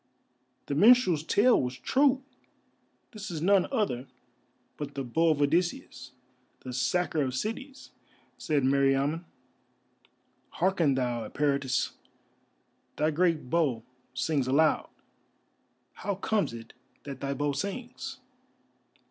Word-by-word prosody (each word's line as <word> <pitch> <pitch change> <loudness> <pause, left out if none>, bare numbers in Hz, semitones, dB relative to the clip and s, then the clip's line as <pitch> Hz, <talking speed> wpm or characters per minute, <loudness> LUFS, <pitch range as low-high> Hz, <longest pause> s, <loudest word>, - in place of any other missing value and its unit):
"The - - -3
minstrel's 200 - +5
tale 215 +9 +3
was 125 0 -4
true! 270 - +2 0.9
This 215 -3 -7
is 165 -3 -4
none 190 +3 +3
other 140 - -1 0.7
but 145 -1 -7
the 135 - -3
Bow 160 +7 +1
of 150 -2 +2
Odysseus, 145 -5 -1 0.5
the 130 - -7
sacker 160 +4 0
of 130 -2 -1
cities," 260 - -5 0.4
said 150 -3 0
Meriamun. 140 +4 +2 1.3
"Hearken 170 -6 +2
thou, 120 -3 -1
Eperitus, 140 -2 0 1.0
thy 155 +1 +1
great 165 -4 0
bow 145 -9 +1 0.3
sings 135 +1 0
aloud. 150 +4 +2 1.0
How 200 0 -3
comes 205 +2 0
it 115 -1 -10 0.3
that 140 -2 -7
thy 140 0 -2
bow 145 0 0
sings?" 215 - -5
150 Hz, 110 wpm, -28 LUFS, 135-190 Hz, 1.3 s, minstrel's